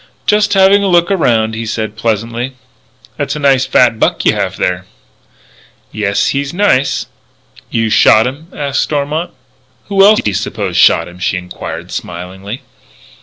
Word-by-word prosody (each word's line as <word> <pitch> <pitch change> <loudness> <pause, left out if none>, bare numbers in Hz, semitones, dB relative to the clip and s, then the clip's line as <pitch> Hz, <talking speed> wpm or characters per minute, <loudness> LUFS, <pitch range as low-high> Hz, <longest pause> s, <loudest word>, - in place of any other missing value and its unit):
"Just 210 -1 +2
having 195 +1 +5
a 200 - 0
look 175 0 +3
around," 115 - +1
he 110 +1 -4
said 110 -1 -4
pleasantly. 115 +3 -2 0.6
"That's - - -2
a - - -4
nice 135 -2 +2
fat 120 -3 +3
buck - - 0
you - - +4
have - - -3
there." 90 0 -2 1.0
"Yes, 100 -2 0
he's 140 +3 -2
nice." 180 -9 +1 0.6
"You 115 -1 -1
shot 110 +1 +5
him?" 140 +6 -5
asked 140 -1 -2
Stormont. 150 +4 -2 0.6
"Who 195 -1 +4
else 210 +2 +6
do 105 - -1
you - - -6
suppose 100 -2 -3
shot - - +4
him?" 90 +1 -13
she 90 0 -1
enquired, 90 0 -7
smilingly. 95 +6 -7
120 Hz, 155 wpm, -14 LUFS, 105-160 Hz, 1.0 s, else